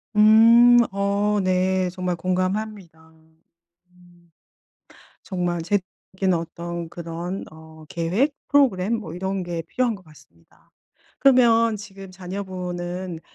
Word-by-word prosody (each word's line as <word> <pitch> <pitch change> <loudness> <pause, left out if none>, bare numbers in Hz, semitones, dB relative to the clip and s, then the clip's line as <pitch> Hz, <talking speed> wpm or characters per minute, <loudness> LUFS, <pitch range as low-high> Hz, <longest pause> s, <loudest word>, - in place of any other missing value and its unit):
음 230 +3 +7
어 200 +1 0
네 185 0 +1
정말 180 -1 -3
공감합니다. 185 -2 -3 0.8
음. 175 -1 -24 0.9
정말 175 -3 -2
제도적인 190 +1 -2
어떤 170 0 -5
그런 170 +3 -6
어 160 0 -14
계획, 185 - 0
프로그램 230 -7 +2
뭐 185 -8 -7
이런 190 +1 -3
게 175 -2 -4
필요한 240 +8 -1
것 195 - -18
같습니다. 85 - -22 0.5
그러면 230 -4 +4
지금 195 -2 -11
자녀분은 180 -2 -6
185 Hz, 220 characters per minute, -23 LUFS, 175-205 Hz, 0.9 s, 음